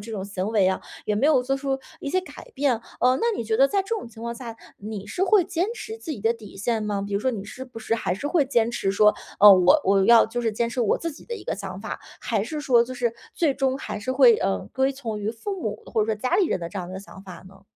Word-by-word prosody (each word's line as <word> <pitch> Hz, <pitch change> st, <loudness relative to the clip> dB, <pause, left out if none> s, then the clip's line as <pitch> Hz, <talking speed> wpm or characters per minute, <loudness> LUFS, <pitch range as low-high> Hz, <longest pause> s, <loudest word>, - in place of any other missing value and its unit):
这 225 Hz, +2 st, -8 dB
种 195 Hz, -2 st, -4 dB
行 195 Hz, -1 st, -4 dB
为 205 Hz, -4 st, +3 dB
啊， 190 Hz, -, -1 dB, 0.3 s
也 210 Hz, -, +1 dB
没 250 Hz, +7 st, +2 dB
有 290 Hz, -5 st, +4 dB
做 270 Hz, +2 st, 0 dB
出 270 Hz, -1 st, -2 dB, 0.2 s
一 -, -, -5 dB
些 370 Hz, +6 st, +1 dB
改 370 Hz, -, -12 dB
变。 265 Hz, -5 st, +1 dB, 0.2 s
呃， 255 Hz, +1 st, +4 dB
那 465 Hz, -1 st, +1 dB
你 -, -, -2 dB
觉 220 Hz, 0 st, 0 dB
得 270 Hz, +3 st, +6 dB
在 390 Hz, +7 st, 0 dB
这 385 Hz, -, -16 dB
种 415 Hz, -, -6 dB
情 225 Hz, 0 st, -13 dB
况 235 Hz, 0 st, -3 dB
下， 230 Hz, -2 st, -8 dB, 0.2 s
你 205 Hz, -1 st, -7 dB
是 375 Hz, -, -1 dB
会 395 Hz, 0 st, +5 dB
坚 350 Hz, +2 st, -1 dB
持 445 Hz, -2 st, -7 dB
自 380 Hz, -8 st, -8 dB
己 255 Hz, -, -5 dB
的 225 Hz, +3 st, +2 dB
底 220 Hz, -4 st, -12 dB
线 220 Hz, +3 st, -1 dB
吗？ 205 Hz, -2 st, -2 dB
比 205 Hz, -, -7 dB
如 200 Hz, -, +1 dB
说 260 Hz, -, +1 dB
你 210 Hz, -5 st, -5 dB
是 255 Hz, +5 st, -8 dB
不 250 Hz, -3 st, -11 dB
是 225 Hz, 0 st, -1 dB
还 220 Hz, -5 st, -1 dB
是 245 Hz, +10 st, -5 dB
会 305 Hz, -1 st, +2 dB
坚 235 Hz, -4 st, +1 dB
持 215 Hz, -5 st, -1 dB
说， 210 Hz, +2 st, +4 dB, 0.3 s
呃， 205 Hz, 0 st, +11 dB
我 185 Hz, -1 st, +5 dB
我 195 Hz, 0 st, +3 dB
要 235 Hz, +2 st, +7 dB
就 235 Hz, +2 st, -3 dB
是 230 Hz, -, +1 dB
坚 230 Hz, +2 st, 0 dB
持 240 Hz, +2 st, -3 dB
我 225 Hz, -, +2 dB
自 335 Hz, -, -3 dB
己 -, -, -14 dB
的 475 Hz, -, -5 dB
一 -, -, -9 dB
个 -, -, -2 dB
想 -, -, -7 dB
法？ -, -, -6 dB, 0.2 s
还 220 Hz, -4 st, -1 dB
是 300 Hz, +7 st, -4 dB
说 245 Hz, -5 st, +4 dB
就 255 Hz, -, -8 dB
是 240 Hz, -2 st, -1 dB, 0.2 s
最 305 Hz, -5 st, +1 dB
终 265 Hz, -1 st, 0 dB
还 215 Hz, -, -5 dB
是 225 Hz, +5 st, -4 dB
会， 260 Hz, -3 st, +7 dB
呃， 95 Hz, -1 st, 0 dB
归 265 Hz, +1 st, +2 dB
从 235 Hz, -6 st, -5 dB
于 205 Hz, +1 st, -1 dB
父 365 Hz, -, -5 dB
母 210 Hz, -6 st, -4 dB
或 220 Hz, -, -1 dB
者 -, -, -1 dB
说 220 Hz, -, 0 dB
家 250 Hz, +4 st, -1 dB
里 395 Hz, -, +3 dB
人 -, -, -1 dB
的 170 Hz, -, -4 dB
这 195 Hz, +3 st, -6 dB
样 175 Hz, -1 st, -5 dB
的 185 Hz, +1 st, -6 dB
想 195 Hz, -1 st, -12 dB
法 185 Hz, -3 st, -11 dB
呢？ 195 Hz, 0 st, -18 dB
230 Hz, 320 characters per minute, -24 LUFS, 205-270 Hz, 0.3 s, 呃